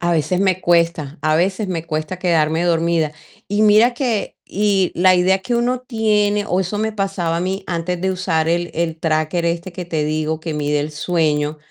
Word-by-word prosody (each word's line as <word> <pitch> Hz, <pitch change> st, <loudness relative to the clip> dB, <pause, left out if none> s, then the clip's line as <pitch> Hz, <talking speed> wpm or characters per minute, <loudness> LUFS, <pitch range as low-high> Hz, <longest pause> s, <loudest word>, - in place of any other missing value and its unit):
A 175 Hz, 0 st, 0 dB
veces 170 Hz, +2 st, +1 dB
me 190 Hz, -2 st, +1 dB
cuesta, 170 Hz, -3 st, +1 dB
a 155 Hz, 0 st, +2 dB
veces 190 Hz, +5 st, 0 dB
me 170 Hz, -3 st, -3 dB
cuesta 155 Hz, +3 st, -3 dB
quedarme 165 Hz, -2 st, +1 dB
dormida. 165 Hz, -2 st, +1 dB, 0.4 s
Y 205 Hz, +1 st, 0 dB
mira 215 Hz, +3 st, +5 dB
que 240 Hz, -5 st, -2 dB
y 200 Hz, -2 st, +1 dB
la 185 Hz, +1 st, +5 dB
idea 185 Hz, +2 st, +3 dB
que 215 Hz, +6 st, -2 dB
uno 245 Hz, +1 st, +1 dB
tiene, 210 Hz, -4 st, +1 dB
o 185 Hz, -3 st, 0 dB
eso 190 Hz, +2 st, -2 dB
me 220 Hz, +1 st, -1 dB
pasaba 195 Hz, -5 st, -2 dB
a -, -, -1 dB
mí 190 Hz, +3 st, -2 dB
antes 175 Hz, +1 st, -2 dB
de 190 Hz, 0 st, +1 dB
usar 180 Hz, -4 st, 0 dB
el 175 Hz, +1 st, 0 dB
el 165 Hz, -1 st, -2 dB
tracker 160 Hz, +1 st, 0 dB
este 170 Hz, +2 st, -2 dB
que 180 Hz, +1 st, -6 dB
te 160 Hz, -3 st, -1 dB
digo 155 Hz, +1 st, -1 dB
que 160 Hz, 0 st, -5 dB
mide 150 Hz, 0 st, 0 dB
el 150 Hz, +2 st, -3 dB
sueño, 155 Hz, -2 st, 0 dB
175 Hz, 200 wpm, -19 LUFS, 160-195 Hz, 0.4 s, mira